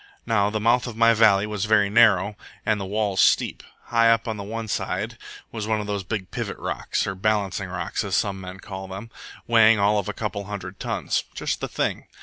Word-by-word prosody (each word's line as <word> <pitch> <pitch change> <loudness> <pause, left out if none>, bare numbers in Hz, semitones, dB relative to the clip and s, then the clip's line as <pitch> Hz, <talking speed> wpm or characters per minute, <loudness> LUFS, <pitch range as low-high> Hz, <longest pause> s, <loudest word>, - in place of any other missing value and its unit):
Now 105 -3 +2
the 110 +1 -2
mouth 120 +3 +2
of 115 -2 -7
my 115 0 +6
valley 105 -3 +5
was 105 -1 -3
very 105 -1 +4
narrow, 105 -2 +4 0.3
and 105 -2 +1
the 95 - -4
walls 100 -1 0
steep. - - +3 0.2
High 115 -1 +3
up 115 +1 +2
on 110 - -2
one 110 +3 -5
side - - -2 0.4
was 110 -2 -4
one 110 -1 +1
of 105 - -4
those 100 -1 -3
big 95 -2 -4
pivot - - -4
rocks, - - -2
or 95 - -2
balancing 100 -1 -1
rocks, 90 0 -3
as 100 -3 -1
some 95 0 0 0.2
call 95 -1 -7
them, 95 +5 -8 0.3
weighing 115 -1 +6
all 105 +1 +3
of 100 - -4
a - - -3
couple 105 -2 -4
of 100 - -10
hundred 100 -3 -7
tons. - - -1
Just - - -2
the - - -2
thing. - - -2
105 Hz, 210 wpm, -24 LUFS, 100-110 Hz, 0.4 s, my